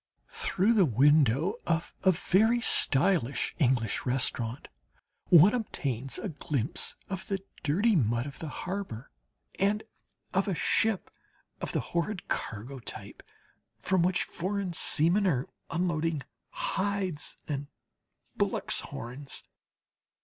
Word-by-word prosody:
Through 200 +5 +1
the 205 -5 +5
window 145 - +3
of 165 0 0
a 190 - +5
very 215 +7 +3
stylish 145 - +3
English 125 -6 +1
restaurant 125 -1 -2 0.6
one 180 +4 +8
obtains 135 - -2
a - - -4
glimpse 145 -4 -2
of 190 -1 -5
the 195 - 0 0.2
dirty 200 +10 +2
mud 120 - +1
of 140 -1 -8
the 160 - -5
harbour 175 - -5 0.5
and 205 +2 +2 0.5
of 195 +2 +1
a 195 - 0
ship 220 +3 +1 0.5
of - - -3
the - - 0
horrid 175 +3 -1
cargo 120 +5 -4
type, 115 - -9 0.6
from 185 - +1
which 180 +1 +2
foreign 190 0 -3
seamen 170 +6 +3
are 135 -7 +1 0.2
unloading 165 -4 -1 0.3
hides 190 -5 -2
and 145 -1 -3 0.7
bullocks' - - 0
horns. 130 +4 -6
165 Hz, 115 wpm, -29 LUFS, 135-195 Hz, 0.7 s, one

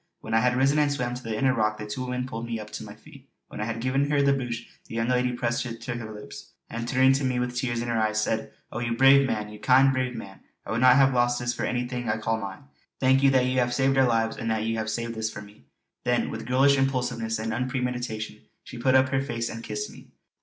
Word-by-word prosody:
When 110 - -5
I 115 - +5
had 125 +1 +2
risen 140 +3 +3
and 145 -1 +3
swam 125 -3 -2
to 125 - -6
the 115 -3 -4
inner 130 +1 +3
rock 110 -2 0
the 105 - -6
two 105 +5 -5
women 125 0 -3
pulled 115 -2 -6
me 115 -1 -3
up 105 0 -9
to - - -6
my 105 0 -10
feet. 140 +3 -17 0.2
When - - -7
I 110 +2 -1
gave 125 +3 -3 0.2
her 145 -1 +3
the 140 0 +4
brooch 120 -3 -4 0.2
the - - -8
young 115 +1 0
lady 125 0 +2
pressed 120 -1 -1
it 115 -1 -7
to 125 - -4
her 115 -2 -6
lips, 105 -1 -10 0.2
and 115 0 -4
turning 130 +1 +4
to 135 +1 0
me 130 -1 0
with 125 0 -2
tears 120 -1 -1
in - - -5
her 115 -1 0
eyes 110 0 +1
said: 110 0 -1 0.2
"Oh 120 - -4
you 120 -1 -1
brave 135 +1 +6
man! 105 -4 -2
You 105 0 -11
kind, 130 +5 +5
brave 130 -1 -1
man! 95 -3 -9 0.3
I - - -6
would 115 +2 0
not 125 -1 +7
have 135 -1 +5
lost 120 0 +2
this 120 0 -1
for - - -3
anything 125 0 -2
I - - +1
call 110 +1 -1
mine. 95 -1 -7 0.4
Thank 130 +1 +4
you 140 - +6
that 130 -2 +3
you 130 0 +1
have 120 0 +1
saved 135 0 +2
our 130 -1 +4
lives; 115 -1 +1
and 115 - -3
that 110 -1 0
you 115 0 -1
have 110 0 -2
saved 115 +1 -3
this 110 -1 -2
for 105 - -8
me." 105 -7 -17 0.4
Then - - +1
with - - -6
girlish 135 +2 +4
impulsiveness 125 -4 -1
and 110 +1 -3
unpremeditation 125 -4 -3 0.2
she 120 - -9
put 130 +2 +3
up 130 0 +5
her 135 0 +1
face 115 -4 -3
and 115 0 -7
kissed 420 - -4
me. - - -14
120 Hz, 270 wpm, -26 LUFS, 110-130 Hz, 0.4 s, not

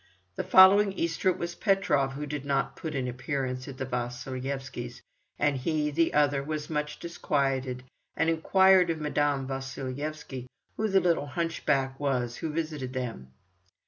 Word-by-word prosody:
The - - -2
following 195 +1 +7
Easter 170 +1 0
it 185 - 0
was 170 -1 -4
Petrov 160 -10 +1
who 145 +2 -4
did 145 -1 -4
not 140 -1 0
put 155 -2 -5
in 130 - 0
an - - -2
appearance 130 0 -3
at 135 -2 -8
the 135 - -3
Vasilyevskys', 125 0 -4 0.3
and 145 -1 +2
he, 150 +2 0
the 165 +3 +1
other, 145 -2 +3
was 150 +2 -4
much 150 -1 -2
disquieted, 135 -6 -1 0.3
and 165 - +2
inquired 185 +2 +5
of 165 -1 -1
Madame 145 -2 0
Vasilyevsky 135 0 -5 0.3
who 220 - 0
the 195 -2 +3
little 170 -5 +1
hunchback 145 -4 -1
was 125 -4 -1
who 160 - -3
visited 150 -5 -3
them. 120 - -4
145 Hz, 155 wpm, -28 LUFS, 130-160 Hz, 0.3 s, following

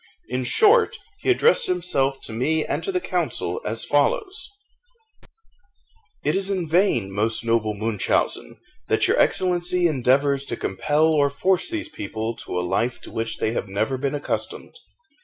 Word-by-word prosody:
In 125 +1 -2
short, 445 - +4 0.2
he - - -2
addressed 470 +5 +4
himself 140 - 0
to 110 - -6
me 155 +7 0
and - - -3
to 390 - -2
the 365 - 0
council 450 - -2
as - - -1
follows: 435 -5 0 1.8
"It 150 - +2
is 195 0 0
in 185 -4 -1
vain, 155 - +2
most 110 +3 0
noble 115 -2 +1
Munchausen, 105 - -1 0.3
that - - +2
your - - +2
Excellency 180 -1 +2
endeavours 140 -1 +2
to 120 - -4
compel 150 +11 +1
or 145 -3 +3
force 185 +6 +1
these 330 -1 -3
people 110 - -5
to 90 - -4
a 90 - -2
life 120 +7 -1
to - - -11
which 115 0 -2
they 110 - -1
have 115 - -3
never 105 +7 -1
been 140 +2 -2
accustomed. 145 - -4
140 Hz, 160 wpm, -23 LUFS, 115-190 Hz, 1.8 s, short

